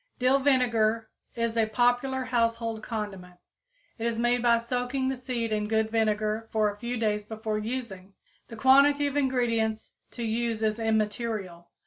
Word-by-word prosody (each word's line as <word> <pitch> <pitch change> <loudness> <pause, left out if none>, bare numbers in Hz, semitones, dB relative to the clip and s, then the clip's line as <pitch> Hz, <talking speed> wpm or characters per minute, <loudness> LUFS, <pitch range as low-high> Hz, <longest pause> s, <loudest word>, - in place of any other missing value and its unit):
Dill 255 +2 +3
vinegar 235 -5 +2 0.2
is 230 -1 -1
a 225 -1 +2
popular 245 +4 +1
household 230 -2 -1
condiment. 195 -6 -6 0.6
It 230 - -1
is 230 -1 -2
made 240 +1 +2
by 235 -1 +4
soaking 250 +3 -2
the 265 - -1
seed 245 -3 -3
in 210 -1 0
good 220 0 0
vinegar 215 0 0
for 215 -1 +2
a 205 - -12
few 240 +3 -4
days 210 -2 0
before 220 0 -4
using. 210 -5 -6 0.3
The 230 - -9
quantity 280 +4 +5
of 285 0 -2
ingredients 235 -5 0 0.2
to 235 - -5
use 225 0 -1
is 215 +1 0
immaterial. 215 -5 -2
230 Hz, 155 wpm, -27 LUFS, 215-245 Hz, 0.6 s, quantity